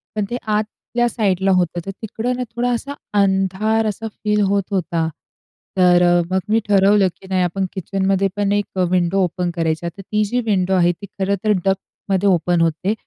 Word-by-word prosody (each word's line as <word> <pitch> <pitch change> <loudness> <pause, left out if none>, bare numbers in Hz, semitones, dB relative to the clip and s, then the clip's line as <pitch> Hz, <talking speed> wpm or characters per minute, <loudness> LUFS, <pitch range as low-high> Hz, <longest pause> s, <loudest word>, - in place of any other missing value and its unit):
पण 210 -1 0
ते 245 - -2
आतल्यासाईडला 210 -2 0
होतं. 175 -2 +1
तर 195 - -4
तिकडं 225 +3 -2
ना 250 - -2
थोडा 245 +1 0
असा 280 +4 -4 0.3
अंधार 195 +3 +1
असा 220 +1 -3
फील 210 0 -1
होत 200 0 +1
होता. 170 -3 0 0.7
तर 180 -1 +5
अ, 175 0 +4
मग 190 - +2
मी 225 +1 +4
ठरवलं 200 0 +4
की 190 - -13
नाही 185 -1 +1
आपण 190 +2 -1
किचनमध्ये 195 +1 0
पण 205 -1 0
एक 205 0 +1
अ, - - +3
विंडो 185 +1 +2
ओपन 180 0 -1
करायचा. 165 0 -1
तर 195 +4 -12
ती 210 +2 0
जी 245 +4 -1
विंडो 190 -3 +1
आहे 175 -1 +4
ती 200 +4 -9
खरं 195 +1 +1
तर 215 - +2
डक्टमध्ये 195 0 -1
ओपन 175 -1 +2
होते. 165 +5 +1
195 Hz, 185 wpm, -20 LUFS, 180-210 Hz, 0.7 s, तर